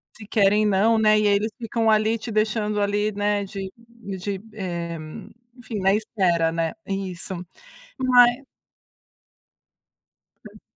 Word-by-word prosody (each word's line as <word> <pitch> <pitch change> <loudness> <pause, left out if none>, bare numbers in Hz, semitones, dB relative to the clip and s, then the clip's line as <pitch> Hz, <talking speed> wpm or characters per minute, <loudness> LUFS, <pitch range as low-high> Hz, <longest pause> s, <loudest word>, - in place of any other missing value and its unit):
Se 210 -3 -12
querem 210 0 +3
não, 210 +3 +3
né. 215 -1 +4
E 210 - +2
aí 200 - +4
eles 215 +2 -1
ficam 230 -1 -1
ali 215 +1 +3
te 225 +1 -7
deixando 215 -1 0
ali, 205 +1 0
né, 205 0 0
de 195 -1 -7
de, 200 -5 -7
eh, 170 -4 -4 0.6
enfim, 230 -3 -6
na 195 0 +3
espera 185 -6 +1
né 165 0 -1
isso, 190 -2 -4 0.6
vai 250 0 +4 2.0
Hã. - - -14
210 Hz, 130 wpm, -23 LUFS, 195-220 Hz, 2.0 s, né